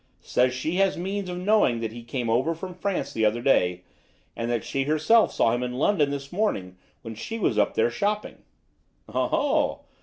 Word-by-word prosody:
Says 125 +1 +2
she 155 +7 -2
has 195 0 +2
means 190 +2 -3
of 180 - -4
knowing 185 - +2
that 115 -1 -3
he 120 +1 -9
came 120 +1 -4
over 130 +9 +1
from 180 +3 -7
France 190 +1 -3
the 110 - -1
other 110 +2 +2
day; 90 -8 +2 0.5
and 115 0 -3
that 120 -2 -1
she 135 0 -2
herself 155 +10 +4
saw 115 - +2
him 120 - -1
in 125 0 -3
London 150 -1 +2
this 140 -1 -5
morning 100 - -1 0.3
when 115 - -6
she 225 - -6
was - - +1
up - - +2
there 460 +1 +2
shopping." 210 +1 -2 0.7
"Oho!" - - 0
140 Hz, 190 wpm, -25 LUFS, 120-195 Hz, 0.7 s, herself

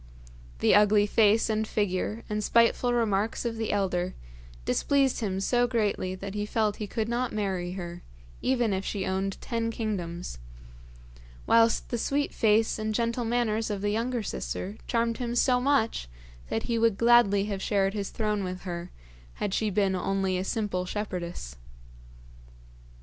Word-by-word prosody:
The - - +5
ugly 210 0 +5
face 215 +1 +4
and 220 -1 0
figure 210 +2 -1
and 210 -1 -2
spiteful 235 +3 +3
remarks 225 -2 0
of 230 -1 -2
the 225 -1 -1
elder 185 -3 0 0.5
displeased 275 - +2
him 195 -4 -2
so 245 +5 +2
greatly 210 -6 0
that 195 +1 -7
he 210 0 -2
felt 215 -1 0
he 210 - -4
could 220 +2 -2
not 240 +1 -1
marry 190 -4 -2
her 175 -2 -6 0.4
even 240 -5 +1
if 190 0 -1
she 195 -2 -3
owned 190 +1 -2
ten 230 -1 -2
kingdoms, 180 - -4 1.1
whilst 230 0 +3
the 240 - -2
sweet 285 +4 0
face 220 0 +2
and 215 0 -2
gentle 235 +1 0
manners 225 -2 0
of 205 -2 -3
the 205 0 0
younger 235 +2 -1
sister 200 0 -4
charmed 230 0 0
him 240 -1 -2
so 250 0 +3
much 250 - +1 0.4
that 225 - -1
he 230 -1 -1
would 225 -3 +3
gladly 230 -4 +5
have 200 -2 -3
shared 195 -1 +1
his 200 -2 -3
throne 210 -2 -1
with 185 0 -5
her 175 -1 -5 0.5
had 195 - -2
she 215 +1 +1
been 195 -1 +1
only 190 +1 0
a 185 - -1
simple 195 -3 -1
shepherdess. 175 - -5
210 Hz, 160 wpm, -28 LUFS, 195-230 Hz, 1.1 s, The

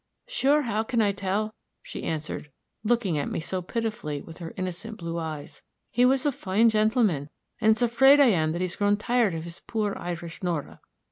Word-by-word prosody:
"'Sure, 300 - +2
how 220 -3 0
can 230 +1 -1
I 210 -2 +4
tell?' 200 +2 -2 0.3
she - - -7
answered, 155 -2 -4 0.3
looking 210 -8 +1
at 145 - -2
me - - -2
so 185 +3 -3
pitifully 215 -7 -3
with 165 +4 -11
her 165 -2 -6
innocent 185 +4 -4
blue 170 0 -4
eyes. 155 -3 -6 0.3
'He 245 +2 +4
was 265 +1 +3
a 290 - +3
fine 220 -1 +2
gentleman, 215 - +2 0.3
and 220 -1 +3
it's 220 +2 +4
afraid 270 +5 +6
I 280 -3 +7
am 160 -6 +2
that 170 - -3
he's 180 -1 -1
grown 205 0 +3
tired 230 -4 +1
of 160 - -4
his 170 0 -7
poor 210 -3 -2
Irish 170 -1 -6
Nora.' 170 -5 -3
205 Hz, 195 wpm, -26 LUFS, 170-230 Hz, 0.3 s, I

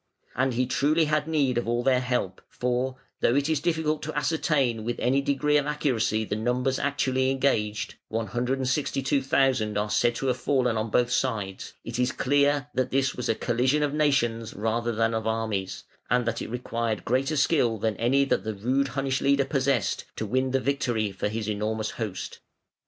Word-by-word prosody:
And 130 0 +1
truly 150 +5 +2
he - - +4
had 150 0 0
need 140 -6 +1
of 120 - -5
all 120 +1 0
their 130 -1 +3
help, 125 -7 -2
for, 125 +1 -1 0.2
though 120 - +2
it 140 +1 +2
is 160 -3 +1
difficult 160 -1 0
to 155 -1 -5
ascertain 145 -7 +1
with 120 +1 -3
any 135 +3 +2
degree 150 +2 +2
of 145 0 0
accuracy 120 -7 0
the 105 - -2
numbers 125 +4 0
actually 130 -2 +1
engaged 120 -6 0
(162,000 130 0 0
are 105 +1 -1
said 120 -1 +2
to 135 - -3
have 125 -2 +1
fallen 125 -3 +1
on 110 +1 -1
both 120 +3 +2
sides), 110 -7 -2
it 115 +1 -5
is 125 0 +2
clear 145 +1 +2
that 130 0 0
this 135 0 +1
was 125 - -4
a 115 - +2
collision 125 +6 +1
of 145 -1 0
nations 125 -7 +1
rather 115 +3 -1
than 115 0 +1
of 110 0 -2
armies, 110 -4 -2 0.3
and 125 -1 +2
that 115 0 -2
it - - -5
required 115 -2 -3
greater 135 +5 +1
skill 130 -6 +2
than 110 0 -1
any 135 +4 +3
that - - 0
the 110 -1 -3
rude 130 +7 +1
Hunnish 135 0 -1
leader 140 0 +3
possessed, 135 -4 0
to 110 - -3
win 130 +5 0
the 135 +1 +1
victory 120 -6 0
for 95 +1 -2
his 110 0 -3
enormous 110 +1 -2
host. 105 -5 -5
125 Hz, 185 wpm, -26 LUFS, 115-140 Hz, 0.3 s, he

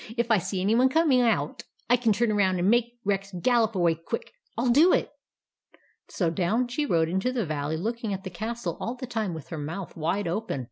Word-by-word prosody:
" 225 +3 -12
If 235 0 0
I 220 - +5
see 185 +2 -3
any 200 +4 +2
one 255 +3 +4
coming 285 -3 +3
out, 210 -12 0 0.3
I 245 - +5
can 235 -2 +1
turn 225 +2 +2
around 190 -3 +2
and 175 +1 +1
make 240 0 +1
Rex 195 0 -1
gallop 230 0 +2
away 175 -3 +3
quick. 165 +8 -6 0.2
I - - 0
'11 245 -2 +3
do 325 +7 +6
it! - - +1 0.5
" - - -33
So 170 -4 +1
down 200 +8 0
she 290 +4 -1
rode 165 -6 +2
into 190 +8 0
the 240 -5 -1
valley, 155 0 -2
looking 225 +4 -3
at 190 -1 -4
the 190 - -6
castle 220 -1 -4
all 235 - -3
the 255 +1 -6
time 220 -7 -3
with 160 - -9
her 160 - -5
mouth 165 +6 -6
wide 170 +5 -1
open. 200 -2 -2
210 Hz, 235 wpm, -26 LUFS, 175-240 Hz, 0.5 s, do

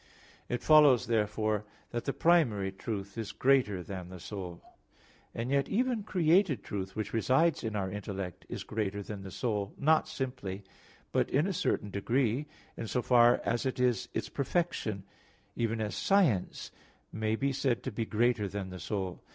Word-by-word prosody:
It 120 - -2
follows, 150 -5 +6
therefore, 110 -2 0 0.3
that 120 - -3
the 140 - +1
primary 125 - +3
truth 100 +1 -5
is 110 - -4
greater 125 -9 +2
than 90 -1 -7
the 90 0 -9
soul. 90 -2 -7 0.7
And 120 +3 -4
yet, 140 0 +2
even 245 +1 +1
created 175 - +2
truth, 95 -1 -5
which 110 -2 -4
resides 130 +8 +2
in 110 -2 -3
our 100 -2 -1
intellect, 100 -3 -5
is - - -5
greater 105 -2 -3
than 100 0 -7
the 95 - -8
soul, 105 0 -2
not 155 +2 +3
simply, 125 -10 -4 0.5
but - - +1
in 145 +5 +2
a 195 - -1
certain 130 - -1
degree, 120 +6 0 0.3
in 115 - -5
so 125 +2 -1
far 120 -1 +5
as 120 0 0
it 130 -1 -2
is 125 -4 +1
its - - -1
perfection; 140 - -1 0.5
even 115 -1 -1
as 105 -1 -2
science 175 - +1 0.4
may 110 0 0
be 135 +3 0
said 130 -3 0
to - - -3
be 115 +2 -2
greater 110 -1 +1
than 95 -1 -5
the 90 - -7
soul. 95 +1 -3
115 Hz, 165 wpm, -31 LUFS, 100-135 Hz, 0.7 s, follows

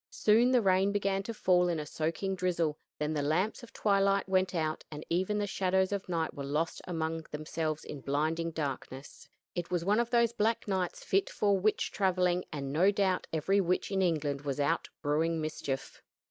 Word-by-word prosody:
Soon 240 - +4
the 250 -3 +3
rain 190 +1 +3
began 195 -1 0
to 215 - -5
fall 180 -5 +3
in 170 -2 0
a 150 - -4
soaking 165 +6 -2
drizzle; 175 -4 0 0.2
then 150 +1 -1
the 150 - 0
lamps 160 +9 0
of 240 - -12
twilight 195 -1 +2
went 185 -1 +1
out, 155 -2 -1
and 150 0 -8
even 190 +4 +1
the 205 - 0
shadows 190 -1 +1
of 200 -1 -3
the - - -6
night 165 -1 -1
were 140 - -6
lost 150 +4 -1
among 165 -2 -2
themselves 155 +1 -3
in 145 - -7
blinding 155 +5 0
darkness. 140 -3 -6 0.2
It 175 -1 -4
was 175 -2 -1
one 205 +3 +3
of 235 0 0
those 235 -1 +3
black 225 0 0
nights 190 -3 -2
fit 195 +1 +1
for 200 -2 +1
witch 215 +3 +1
traveling; 180 -2 +1
and, 140 -2 -4
no 180 +6 +5
doubt, 195 -2 +1
every 190 +6 +2
witch 180 +2 0
in 195 -1 +1
England 150 -6 0
was 140 -1 -3
out 140 - 0
brewing 160 +3 +1
mischief. 145 -3 -4
180 Hz, 195 wpm, -31 LUFS, 155-195 Hz, 0.2 s, no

